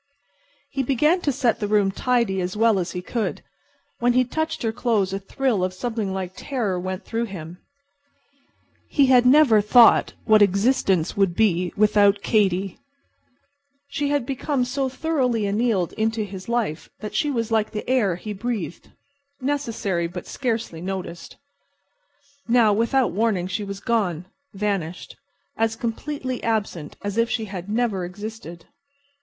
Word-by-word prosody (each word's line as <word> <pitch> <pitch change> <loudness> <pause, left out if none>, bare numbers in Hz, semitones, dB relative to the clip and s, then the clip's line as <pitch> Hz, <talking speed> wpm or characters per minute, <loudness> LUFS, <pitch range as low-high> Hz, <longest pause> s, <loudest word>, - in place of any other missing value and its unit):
He 270 - -1
began 300 +7 +2
to 290 - +1
set 250 -3 +1
the 205 - -1
rooms 205 -2 +2
tidy 235 -7 +1
as 180 +3 -3
well 225 -2 +4
as 175 -1 -3
he 180 - -5
could. 230 +3 -3 0.6
When 245 0 +3
he 255 +1 +4
touched 315 +5 -3
her 225 - +1
clothes 220 -5 0
a 195 - -2
thrill 215 0 -1
of 185 0 -2
something 220 -1 -3
like 190 -1 -4
terror 220 -10 -2
went 185 +1 -5
through 230 +1 -2
him. 175 -4 -8 1.3
He 280 - +4
had 250 -1 +5
never 255 -6 +6
thought 230 +3 +6
what 215 -1 +5
existence 200 -3 +2
would 195 -4 +2
be 180 -5 +2
without 205 -1 +4
Katy. 195 -3 +1 1.1
She 285 0 -1
had 285 -4 0
become 270 0 -1
so 265 +1 -1
thoroughly 255 -5 0
annealed 205 -3 0
into 220 0 -1
his 195 0 -8
life 230 -10 -2
that 210 - -6
she 295 - +1
was 230 -4 -2
like 220 -1 +2
the 210 - -6
air 235 -8 +2
he 210 +4 -6
breathed—necessary 245 -1 -4
but 180 +1 -7
scarcely 230 -10 -3
noticed. 180 -2 -6 1.1
Now, 230 -3 +4
without 235 +4 +2
warning, 200 -2 0
she 185 +3 -3
was 200 -1 -6
gone, 195 -8 -1 0.3
vanished, 195 -4 -3 0.4
as 225 0 +1
completely 255 +3 -4
absent 205 -9 -2
as 205 +2 -2
if 230 0 +2
she 225 -3 -1
had 190 -2 -7
never 215 -4 0
existed. 180 -2 -8
215 Hz, 150 wpm, -23 LUFS, 190-245 Hz, 1.3 s, never